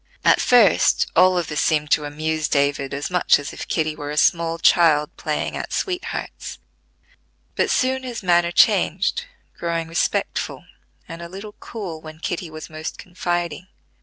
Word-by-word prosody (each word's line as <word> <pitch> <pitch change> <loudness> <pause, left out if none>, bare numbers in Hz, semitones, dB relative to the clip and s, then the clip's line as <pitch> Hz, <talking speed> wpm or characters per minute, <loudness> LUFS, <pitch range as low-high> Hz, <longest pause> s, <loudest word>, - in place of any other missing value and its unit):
At - - +5
first 230 -8 +4
all 185 +2 +5
this 150 -2 -2
seemed 150 -2 +1
to 150 - +3
amuse 155 +1 -2
David 140 -1 0
as 140 +5 -4
much 180 -1 +4
as 145 +1 -7
if - - -7
Kitty 155 -2 -1
were 145 -1 -6
a 150 - -5
small 165 +1 +2
child 160 -2 +3
playing - - -3
at - - -5
sweethearts; 365 -2 -4 1.0
but - - +1
soon 260 0 +1
his 245 -4 -6
manner 175 -1 +3
changed, 200 - +2 0.3
growing 170 -1 -2
respectful, 165 +1 -2 0.4
and 165 +1 -8
a 170 - -8
little 200 +3 -9
cool 185 -8 -7
when 155 0 -10
Kitty 170 +1 -4
was 155 0 -9
most 155 0 -7
confiding. 175 -2 -3
165 Hz, 155 wpm, -22 LUFS, 155-185 Hz, 1.0 s, At